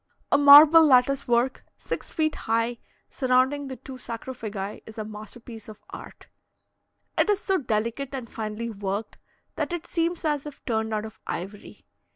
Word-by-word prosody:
A -, -, +5 dB
marble 295 Hz, +3 st, +9 dB
lattice 275 Hz, -1 st, +3 dB
work, 240 Hz, +2 st, +1 dB
six -, -, -6 dB
feet 310 Hz, -1 st, 0 dB
high, 230 Hz, +1 st, -1 dB, 0.3 s
surrounding 260 Hz, +2 st, +1 dB
the 260 Hz, -, -6 dB
two 260 Hz, +1 st, -11 dB
sarcophagi, 225 Hz, -4 st, -6 dB
is 220 Hz, -, -12 dB
a 215 Hz, -, -4 dB
masterpiece 220 Hz, +2 st, -10 dB
of 215 Hz, -, -13 dB
art. -, -, -11 dB, 0.9 s
It -, -, +3 dB
is 410 Hz, -1 st, +2 dB
so 385 Hz, -3 st, 0 dB
delicate 235 Hz, +2 st, -2 dB
and 255 Hz, -3 st, -6 dB
finely 220 Hz, +1 st, -5 dB
worked, 200 Hz, +1 st, -5 dB, 0.4 s
that -, -, -2 dB
it 345 Hz, -1 st, -4 dB
seems 335 Hz, 0 st, -2 dB
as 295 Hz, -2 st, -1 dB
if 295 Hz, -, -12 dB
turned 220 Hz, -2 st, -1 dB
out 215 Hz, 0 st, -2 dB
of 220 Hz, -, -11 dB
ivory. 195 Hz, +4 st, -7 dB
245 Hz, 160 wpm, -25 LUFS, 220-285 Hz, 0.9 s, marble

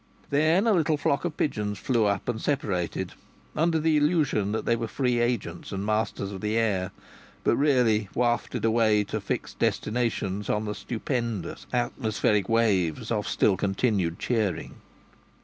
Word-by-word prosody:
Then 155 Hz, +8 st, +3 dB
a 225 Hz, -, +4 dB
little 160 Hz, -4 st, +2 dB
flock 140 Hz, +2 st, 0 dB
of 165 Hz, -3 st, -3 dB
pigeons 105 Hz, -7 st, -1 dB
flew 115 Hz, -2 st, +1 dB
up 100 Hz, -2 st, -1 dB
and 115 Hz, -2 st, -2 dB
separated, 100 Hz, -, -1 dB, 0.4 s
under 165 Hz, +1 st, +2 dB
the 160 Hz, 0 st, +2 dB
illusion 145 Hz, -, +2 dB
that 110 Hz, -, -2 dB
they 115 Hz, -, +3 dB
were 115 Hz, 0 st, -3 dB
free 125 Hz, 0 st, 0 dB
agents 115 Hz, -8 st, -2 dB
and 95 Hz, +1 st, -3 dB
masters 105 Hz, -2 st, -1 dB
of 95 Hz, -2 st, -7 dB
the 105 Hz, +1 st, 0 dB
air, 100 Hz, -5 st, +1 dB, 0.5 s
but -, -, +3 dB
really 120 Hz, -8 st, +2 dB
wafted 120 Hz, -2 st, 0 dB
away 110 Hz, -2 st, +3 dB
to -, -, -4 dB
fixed -, -, -4 dB
destinations 105 Hz, -4 st, -1 dB
on 105 Hz, +1 st, 0 dB
the 105 Hz, -, -2 dB
stupendous 115 Hz, -, -4 dB
atmospheric 110 Hz, -4 st, 0 dB
waves 100 Hz, -9 st, +1 dB
of 105 Hz, -2 st, -1 dB
still 100 Hz, -, +3 dB
continued 95 Hz, -3 st, 0 dB
cheering. 105 Hz, -9 st, -1 dB
110 Hz, 150 wpm, -26 LUFS, 100-125 Hz, 0.5 s, a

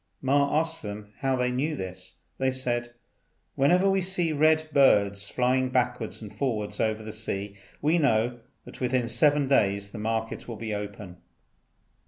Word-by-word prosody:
Ma 140 Hz, +2 st, +2 dB
asked 165 Hz, 0 st, -1 dB
them 105 Hz, 0 st, -8 dB
how 135 Hz, -1 st, +1 dB
they 125 Hz, 0 st, 0 dB
knew 145 Hz, +5 st, -1 dB
this. 95 Hz, -5 st, -6 dB, 0.2 s
They 130 Hz, 0 st, +2 dB
said, 120 Hz, -2 st, -1 dB, 0.6 s
"Whenever 180 Hz, +8 st, +3 dB
we 195 Hz, 0 st, +2 dB
see 180 Hz, -3 st, +1 dB
red 155 Hz, +1 st, +3 dB
birds 100 Hz, -7 st, +4 dB
flying 130 Hz, +1 st, +1 dB
backwards 125 Hz, -3 st, -1 dB
and 105 Hz, -, -10 dB
forwards 110 Hz, -7 st, -2 dB
over 110 Hz, 0 st, 0 dB
the 110 Hz, -, -6 dB
sea, 100 Hz, -2 st, -4 dB, 0.3 s
we 160 Hz, +4 st, +3 dB
know 120 Hz, -3 st, +1 dB, 0.3 s
that -, -, -12 dB
within 125 Hz, -1 st, +1 dB
seven 145 Hz, 0 st, +3 dB
days 100 Hz, -6 st, +2 dB
the 110 Hz, -, -7 dB
market 110 Hz, +1 st, -3 dB
will 115 Hz, -2 st, -6 dB, 0.2 s
open." 100 Hz, -3 st, -7 dB
125 Hz, 155 wpm, -27 LUFS, 105-140 Hz, 0.6 s, birds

